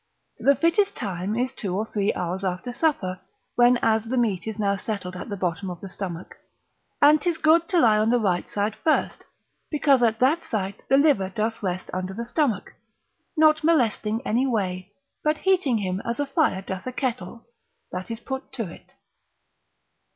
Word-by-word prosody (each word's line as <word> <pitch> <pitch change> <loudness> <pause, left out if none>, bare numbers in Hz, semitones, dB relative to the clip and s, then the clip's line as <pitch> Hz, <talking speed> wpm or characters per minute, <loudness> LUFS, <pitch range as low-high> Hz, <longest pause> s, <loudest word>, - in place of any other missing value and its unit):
The 280 +1 +4
fittest 390 +6 +2
time 195 -2 -3
is 255 +1 -1
two 190 -4 -3
or 215 - -1
three 205 -2 0
hours 180 +2 -3
after 185 +6 -3
supper, 240 - 0 0.3
when 245 0 +5
as 220 0 +2
the 250 +3 -2
meat 220 -5 0
is 220 - -4
now 200 -2 +1
settled 200 -3 -4
at 180 - -7
the 200 - -4
bottom 180 +1 -2
of 175 -1 -7
the 195 - -8
stomach, 185 -2 -6 0.7
and 300 +1 +7
'tis 345 -1 0
good 325 +2 +3
to 360 -3 +3
lie 215 -7 +5
on 215 +1 +2
the 245 - +4
right 185 -5 0
side 205 +1 -1
first, 315 - 0 0.4
because 285 -4 +3
at 225 -2 +3
that 275 +8 +2
site 200 -2 -3
the 270 - +5
liver 280 -11 +3
doth 215 +3 -2
rest 185 -2 -3
under 185 +1 -3
the 235 +2 -4
stomach, 240 - -1 0.6
not 310 0 +5
molesting 240 -6 +1
any 245 +5 +1
way, 190 -5 -2 0.3
but 305 0 +2
heating 350 -10 +2
him 190 -2 -2
as 235 +2 -3
a 290 - +1
fire 275 - +1
doth 190 +3 -6
a - - -2
kettle, 235 -4 -4 0.5
that 180 0 -5
is 225 -1 -4
put 265 +2 -6
to 245 -4 -2
it. - - -17
225 Hz, 185 wpm, -24 LUFS, 190-270 Hz, 0.7 s, and